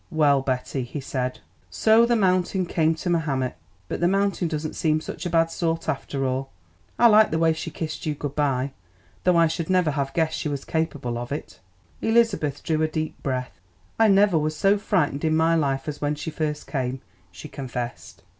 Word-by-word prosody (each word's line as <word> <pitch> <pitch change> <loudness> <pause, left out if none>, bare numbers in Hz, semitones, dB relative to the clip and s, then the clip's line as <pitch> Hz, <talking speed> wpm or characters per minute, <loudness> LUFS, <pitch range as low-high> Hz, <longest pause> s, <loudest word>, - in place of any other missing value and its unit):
"Well, 145 -3 +3
Betty," 130 0 -2
he 125 +4 -5
said, 130 -2 -3 0.3
"so 220 - +4
the 240 - +3
mountain 185 -2 +2
came 160 -1 +1
to 175 +3 -4
Mahomet? 140 -7 0 0.3
But - - -4
the 175 - +3
mountain 195 -1 +1
doesn't 155 -1 -3
seem 155 -3 +1
such 160 +2 -6
a - - -3
bad 165 0 +2
sort, 165 -1 -2
after 135 0 -2
all. 130 +1 -2 0.5
I 240 - +4
liked 215 -1 +7
the 160 - 0
way 160 0 +3
she 160 - -5
kissed 160 -1 -5
you 150 - 0
good 145 0 -5
bye, 140 -2 0 0.5
though 180 -1 +4
I 165 - +6
should 165 +1 -2
never 180 -4 +3
have 140 -1 -3
guessed 160 -1 0
she 150 - -2
was 140 -1 -4
capable 145 -7 -2
of 120 +2 -6
it." 145 - -6 0.4
Elizabeth 225 - +1
drew 155 -1 0
a 155 - +3
deep 155 0 -4
breath. 125 - -3 0.4
"I 225 - +6
never 200 -4 +4
was 155 0 -2
so 200 +5 +3
frightened 170 -9 0
in 160 0 +2
my 165 +1 +3
life 140 -4 0
as 150 -1 -5
when 145 0 0
she 160 +2 -5
first 150 -1 -3
came," 130 -2 -3 0.3
she - - -9
confessed. 125 -4 -6
155 Hz, 200 wpm, -24 LUFS, 140-170 Hz, 0.5 s, liked